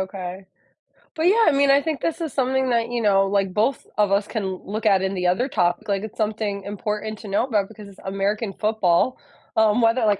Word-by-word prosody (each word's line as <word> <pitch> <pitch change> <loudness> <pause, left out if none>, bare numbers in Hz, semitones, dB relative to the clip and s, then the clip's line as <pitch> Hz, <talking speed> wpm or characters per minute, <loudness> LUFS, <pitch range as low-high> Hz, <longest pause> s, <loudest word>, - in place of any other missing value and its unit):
okay. 190 0 -6 0.7
But, 320 - -2
yeah, 445 +4 +5
I - - +6
mean, 280 0 +3
I 280 +1 +5
think 315 -2 -3
this 330 +1 -2
is 320 -3 -3
something 265 0 +1
that, 235 0 +1
you 240 -1 -2
know, 195 -2 +3
like, 195 -2 0
both 230 +5 0
of 205 -2 +2
us 200 +1 +2
can 215 -4 -3
look 200 +4 -5
at 195 -3 +4
in 190 - -1
the 180 -2 -1
other 185 +9 +1
topic, 175 -11 0
like 200 -2 0
it's 220 - -8
something 210 -2 -2
important 210 +1 -4
to 220 - -10
know 200 +5 +1
about 210 -6 0
because 215 -2 -12
it's 195 -1 -15
American 195 +2 -2
football. 215 +1 +1 0.4
Um, 220 +1 +3
whether 230 +1 +3
like 205 -2 +2
210 Hz, 225 wpm, -23 LUFS, 195-240 Hz, 0.7 s, I